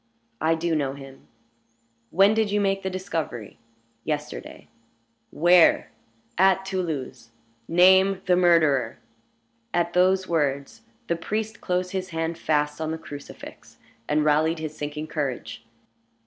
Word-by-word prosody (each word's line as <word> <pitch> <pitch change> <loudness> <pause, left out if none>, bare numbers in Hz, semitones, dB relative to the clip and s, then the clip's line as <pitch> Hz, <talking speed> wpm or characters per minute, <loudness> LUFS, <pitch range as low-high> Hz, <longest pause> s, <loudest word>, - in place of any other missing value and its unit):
"I 160 +2 +2
do 165 +1 -2
know 140 -3 -1
him." 135 -1 -13 0.8
"When 195 +4 +4
did 220 -1 +1
you 205 +1 +1
make 195 -1 0
the 190 - -3
discovery?" 165 - -5 0.4
"Yesterday." 150 -1 -5 0.6
"Where?" 175 +1 +4 0.5
"At 190 0 +4
Toulouse." 165 -11 -4 0.4
"Name 190 +2 +5
the 180 - +3
murderer." 155 -9 +3 0.8
At 175 0 0
those 185 +1 +3
words 140 -4 -1 0.2
the 170 - -1
priest 215 +6 -4
closed 180 0 -1
his 185 -1 -4
hand 165 0 -3
fast 150 0 0
on 160 - -2
the 160 - -3
crucifix, 145 -2 -11 0.3
and 150 0 +2
rallied 155 +2 +2
his 155 -1 -6
sinking 150 +1 -5
courage. 140 -7 -4
165 Hz, 125 wpm, -24 LUFS, 150-185 Hz, 0.8 s, Name